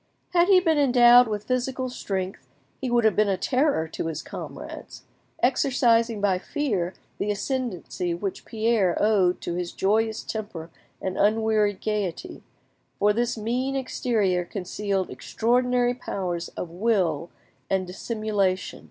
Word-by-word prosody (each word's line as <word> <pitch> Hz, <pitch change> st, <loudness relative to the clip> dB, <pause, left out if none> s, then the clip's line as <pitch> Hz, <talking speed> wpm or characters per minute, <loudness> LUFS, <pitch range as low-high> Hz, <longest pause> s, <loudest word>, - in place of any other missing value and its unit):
Had 350 Hz, 0 st, +4 dB
he 385 Hz, -2 st, +7 dB
been 325 Hz, -4 st, +2 dB
endowed 245 Hz, -2 st, +7 dB
with 210 Hz, -1 st, -3 dB
physical 255 Hz, +2 st, -1 dB
strength 190 Hz, -, -4 dB, 0.3 s
he 260 Hz, -, -2 dB
would 240 Hz, -1 st, +3 dB
have 220 Hz, -, +4 dB
been 210 Hz, -1 st, +3 dB
a 190 Hz, -, +1 dB
terror 255 Hz, -, +1 dB
to 165 Hz, -, -4 dB
his 160 Hz, -1 st, -4 dB
comrades, -, -, -8 dB, 0.4 s
exercising 235 Hz, -3 st, +3 dB
by 195 Hz, -2 st, +2 dB
fear 200 Hz, -, -2 dB, 0.2 s
the 205 Hz, -, -1 dB
ascendancy 200 Hz, -, -2 dB
which 190 Hz, +2 st, -4 dB
Pierre 220 Hz, -5 st, +1 dB
owed 195 Hz, -4 st, +3 dB
to 175 Hz, -, -3 dB
his 175 Hz, 0 st, -3 dB
joyous 220 Hz, +3 st, 0 dB
temper 185 Hz, -7 st, -6 dB, 0.3 s
and 185 Hz, 0 st, -3 dB
unwearied 215 Hz, -1 st, +2 dB
gaiety, 205 Hz, -5 st, -3 dB, 0.6 s
for 210 Hz, +1 st, +3 dB
this 235 Hz, +1 st, -1 dB
mean 250 Hz, +5 st, -1 dB
exterior 220 Hz, -8 st, 0 dB
concealed 195 Hz, +1 st, -3 dB
extraordinary 245 Hz, +1 st, +1 dB
powers 180 Hz, -8 st, -4 dB
of 170 Hz, -, -4 dB
will 175 Hz, -5 st, 0 dB, 0.4 s
and 190 Hz, -1 st, +1 dB
dissimulation. 195 Hz, -1 st, -2 dB
215 Hz, 135 wpm, -25 LUFS, 185-245 Hz, 0.6 s, he